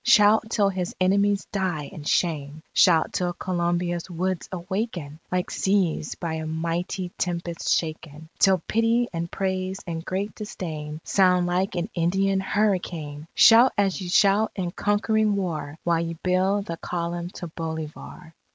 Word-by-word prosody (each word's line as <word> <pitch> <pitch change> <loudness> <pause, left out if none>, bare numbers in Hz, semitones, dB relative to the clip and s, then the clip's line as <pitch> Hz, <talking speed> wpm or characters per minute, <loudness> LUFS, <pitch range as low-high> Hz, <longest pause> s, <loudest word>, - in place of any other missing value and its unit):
Shout 220 -1 +5
till 205 -3 +2
his 185 -2 -3
enemies 200 +2 +2
die 185 -6 -1
in 155 -6 -9
shame! 155 -2 -1
Shout 165 -3 +4
till 175 -1 -1
Colombia's 175 0 -1
woods 180 +1 -2
awaken, 180 -4 -4
Like 180 0 -1
seas 190 -6 0
by 165 -2 -4
a 160 0 -4
mighty 170 +3 -2
tempest 170 -1 -2
shaken, 155 -1 -2
Till 190 -4 +4
pity, 230 +2 +2
and 170 0 -3
praise, 190 0 -2
and 165 -1 -4
great 195 +3 -3
disdain 155 -7 -6
Sound 180 -2 +3
like 180 +2 0
an 175 +1 -1
Indian 190 +3 +1
hurricane! 175 -7 -1
Shout 235 +3 +7
as 200 -1 +1
ye 185 - -5
shout 200 +3 +4
in 180 -3 -2
conquering 210 +2 +1
war, 160 -6 -3
While 170 -1 +2
ye 165 0 -3
build 190 +2 +1
the 165 -3 -5
Column 170 0 -3
to - - -6
Bolivar! 160 +1 -7
180 Hz, 145 wpm, -25 LUFS, 165-195 Hz, -, Shout